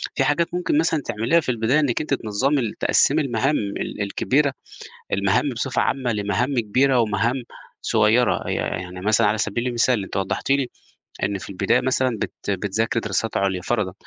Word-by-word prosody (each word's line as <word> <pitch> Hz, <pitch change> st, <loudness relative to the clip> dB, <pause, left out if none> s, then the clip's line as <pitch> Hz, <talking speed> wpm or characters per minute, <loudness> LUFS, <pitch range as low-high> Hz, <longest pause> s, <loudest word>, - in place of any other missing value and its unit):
في 135 Hz, -, +2 dB
حاجات 165 Hz, +5 st, +1 dB
ممكن 180 Hz, -4 st, 0 dB
مثلًا 160 Hz, -1 st, +2 dB
تعمليها 115 Hz, +10 st, +2 dB
في 150 Hz, -, -4 dB
البداية 120 Hz, +5 st, +2 dB
إنِّك 140 Hz, -4 st, +1 dB
أنتِ 150 Hz, -, -2 dB
تنظّمي 130 Hz, +4 st, 0 dB
ال 115 Hz, -4 st, -2 dB
تقسّمي -, -, +3 dB
المهام 135 Hz, +2 st, 0 dB
ال 100 Hz, +1 st, -4 dB
الكبيرة، 135 Hz, +7 st, +1 dB, 0.6 s
المهام 100 Hz, +8 st, +2 dB
بصفة 125 Hz, +1 st, -1 dB
عامة 130 Hz, -3 st, 0 dB
لمهام 115 Hz, +6 st, -1 dB
كبيرة 125 Hz, +4 st, +2 dB
ومهام 115 Hz, +4 st, 0 dB, 0.4 s
صغيرة. 115 Hz, +4 st, +2 dB
ي -, -, 0 dB
يعني 90 Hz, 0 st, -4 dB
مثلًا 105 Hz, +3 st, +3 dB
على 105 Hz, +1 st, +1 dB
سبيل 110 Hz, +3 st, -1 dB
المثال، 120 Hz, -3 st, +1 dB
أنتِ -, -, -7 dB
وضّحتِ 95 Hz, +6 st, -2 dB
لي 135 Hz, -2 st, +2 dB, 0.5 s
إن 100 Hz, +1 st, 0 dB
في 95 Hz, -, -9 dB
البداية 95 Hz, 0 st, +1 dB
مثلًا 130 Hz, -2 st, 0 dB
بت -, -, -3 dB, 0.2 s
بتذاكري 105 Hz, +4 st, -1 dB
دراسات 105 Hz, +1 st, -2 dB
عُليا 95 Hz, -2 st, 0 dB
فَرَضًا، 105 Hz, -5 st, -1 dB
115 Hz, 170 wpm, -22 LUFS, 100-135 Hz, 0.6 s, تقسّمي